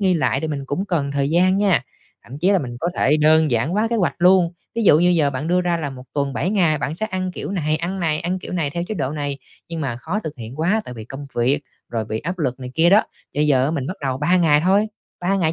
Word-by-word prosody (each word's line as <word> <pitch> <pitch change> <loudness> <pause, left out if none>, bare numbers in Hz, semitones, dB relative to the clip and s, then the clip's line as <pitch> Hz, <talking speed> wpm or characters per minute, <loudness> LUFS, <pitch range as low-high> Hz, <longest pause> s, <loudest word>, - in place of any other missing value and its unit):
nghi 190 -2 +3
lại 155 - +1
thì 160 - -3
mình 140 -2 -3
cũng 180 +8 -2
cần 155 -8 -1
thời 140 +1 0
gian 185 +3 +3
nha, 200 -7 +3 0.4
thậm 130 +4 -9
chí 180 +5 +2
là 195 - +4
mình 120 -5 -5
có 170 - 0
thể 150 +3 +3
đơn 155 0 +4
giản 120 +5 +1
hoá 210 +5 +1
kế 235 - 0
hoạch 185 -5 +1
luôn. 180 -1 +4 0.2
Ví 230 - -1
dụ 155 - +7
như 175 +1 +4
giờ 160 -5 +3
bạn 140 +5 -4
đưa 180 +1 +3
ra 175 -1 0
là 150 -4 -3
1 130 -1 -10
tuần 140 -1 -1
7 180 - -1
ngày, 170 -8 +2
bạn 150 - -3
sẽ 215 +6 -2
ăn 185 -3 -3
kiểu - - -5
này 155 -5 0
ăn 180 +4 -3
này 155 -3 0
ăn 180 +2 -2
kiểu 185 - -8
này 160 -5 -1
theo 170 +4 -3
chế 215 - -4
độ 140 -7 -2
này, 145 -2 -3 0.3
nhưng 165 -1 -4
mà 125 -5 -2
khó 170 - -3
thực 155 -7 -6
hiện 120 +6 -8
quá 205 +7 +2
tại 125 - -8
vì 110 -2 -8
công 135 +4 -8
việc, 130 +5 +2 0.3
rồi 115 -2 -2
bị 110 +1 -3
áp 180 +7 -4
lực 130 -4 -2
này 125 - -6
kia 170 +2 +4
đó, 210 +2 +6 0.3
thì - - -4
bây 150 - +3
giờ 130 -3 +3
á 145 - 0
mình 140 -5 -2
bắt 185 - -5
đầu 130 -2 -2
3 170 +5 +2
ngày 155 -4 +4
thôi, 195 +5 +3 0.3
3 190 +3 +1
ngày 165 -4 +1
160 Hz, 295 wpm, -21 LUFS, 140-180 Hz, 0.4 s, dụ